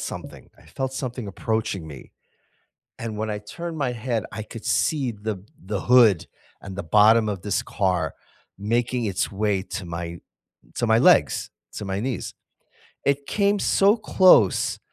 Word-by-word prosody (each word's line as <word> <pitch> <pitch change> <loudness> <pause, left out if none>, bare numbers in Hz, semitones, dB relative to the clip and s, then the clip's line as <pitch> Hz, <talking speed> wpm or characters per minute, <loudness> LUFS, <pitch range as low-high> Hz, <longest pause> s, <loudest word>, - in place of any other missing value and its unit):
something - - -8
I - - -20
felt 130 0 -4
something 125 -3 -5
approaching 100 -3 -2
me. 70 -4 -11 0.9
And 115 -2 -5
when 110 0 -2
I 105 - -3
turned 170 +11 -7
my 135 -5 -1
head, 115 -2 -2
I 110 0 -5
could 115 +1 -10
see 135 -6 +1
the 105 -2 -5 0.2
the 100 0 -3
hood 120 -8 +5 0.3
and 95 -1 -9
the 100 - -3
bottom 110 +5 +5
of 100 -4 -4
this 105 - -1
car 90 -7 -1 0.4
making 120 +4 0
its 95 -3 -1
way 100 -1 0
to 95 - -6
my 85 0 -5 0.6
to - - -1
my - - +4
legs, - - +4 0.2
to - - -5
my 95 0 -2
knees. 125 +1 -4 0.7
It 140 0 0
came 200 0 +1
so 200 +2 +4
close 185 - +4
110 Hz, 155 wpm, -24 LUFS, 100-125 Hz, 0.9 s, hood